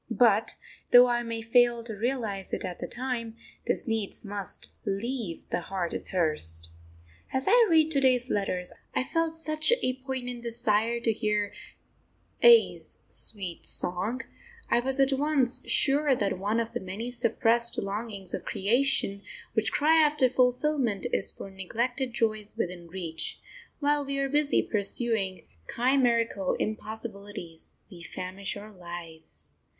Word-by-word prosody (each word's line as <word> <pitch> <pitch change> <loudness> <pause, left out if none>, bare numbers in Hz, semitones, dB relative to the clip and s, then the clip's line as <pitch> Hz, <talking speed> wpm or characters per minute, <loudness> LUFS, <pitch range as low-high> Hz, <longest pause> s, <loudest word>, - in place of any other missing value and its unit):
But, 225 -2 +3 0.3
though 245 0 +9
I 240 -1 +1
may 230 -1 -4
fail 240 0 +3
to 230 -1 -5
realise 215 -4 -2
it - - -2
at 175 - -6
the - - -4
time, 240 -3 -4 0.3
this - - 0
needs 225 -2 -2
must 200 -1 -5
leave 210 -2 -3
the - - -1
heart 180 -1 -3
athirst. 85 - -2 0.6
As 265 0 0
I 465 +3 +6
read 320 -1 +4
to 280 - +3
day's 255 -1 +3
letters, 185 -3 -2 0.2
I - - +2
felt 330 +3 -1
such 310 +3 +4
a 255 - +2
poignant 250 -2 -4
desire 230 -1 0
to 230 -1 +2
hear 210 -1 -1 0.9
A 470 -1 +7
's - - -7
sweet 190 -5 -1
song, 195 +8 +2 0.5
I - - +4
was 265 +2 0
at 270 0 +4
once 270 -3 +3
sure 285 0 +4
that 200 -5 -1
one 210 +4 0
of 230 0 -2
the - - -3
many 200 +6 -6
suppressed 235 0 +2
longings 200 -1 -4
of - - -3
creation 205 -1 +1 0.3
which 220 -2 +1
cry 320 +2 +4
after 295 -3 +3
fulfilment 250 -3 +1
is - - +3
for 195 - -9
neglected 240 +7 -2
joys 215 -2 -2
within 175 -5 -4
reach; 165 -2 -4 0.4
while 290 0 +2
we 275 0 -3
are 275 0 0
busy 290 +1 +2
pursuing 205 -2 -1 0.2
chimerical 235 -6 +1
impossibilities 205 -5 -6 0.2
we 175 -2 -11
famish 185 +4 -6
our 210 +1 -10
lives.... 160 - -7
230 Hz, 145 wpm, -28 LUFS, 195-255 Hz, 0.9 s, though